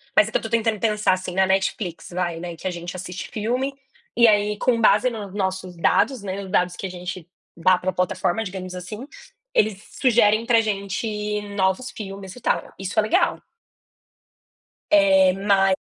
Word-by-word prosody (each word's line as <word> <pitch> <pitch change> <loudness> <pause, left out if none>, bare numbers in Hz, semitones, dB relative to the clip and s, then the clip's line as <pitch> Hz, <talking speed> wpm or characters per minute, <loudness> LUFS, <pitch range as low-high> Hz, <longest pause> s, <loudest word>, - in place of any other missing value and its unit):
mas 210 - +6
é 220 - -7
que - - +2
eu - - -8
tô 225 - -5
tentando 225 -2 +1
pensar 210 -3 +2
assim, 185 -1 -4
na 190 0 +4
Netflix, 190 -2 -1
vai, 175 -2 -2
né, 175 -1 -6
que 165 - -14
a - - -1
gente 175 +1 -6
assiste 180 0 -6
filme, 250 +5 -1 0.4
e 235 - +6
aí 210 -1 +3
com 235 0 +1
base 215 +3 +4
nos 205 -5 -7
nossos 190 -2 -3
dados, 220 +7 +2
né, 195 0 -4
nos 190 - -8
dados 180 -2 +1
que 195 - -4
a - - -8
gente 180 -1 -7 0.3
dá 180 +2 +4
pra 185 +1 -2
plataforma, 180 +2 0
digamos, 185 -2 -6
assim, 185 +7 -7 0.5
eles 210 -2 +2 0.2
sugerem 230 -3 +4
pra 230 -1 +4
gente 210 0 -2
novos 190 +5 0
filmes, 195 -2 -8
e - - -11
tal, - - -1
isso 190 +3 -5
é 215 - +7
legal. 215 - +1 1.5
Eh, 290 -2 +5
mas 195 -1 +3
200 Hz, 180 wpm, -23 LUFS, 185-220 Hz, 1.5 s, é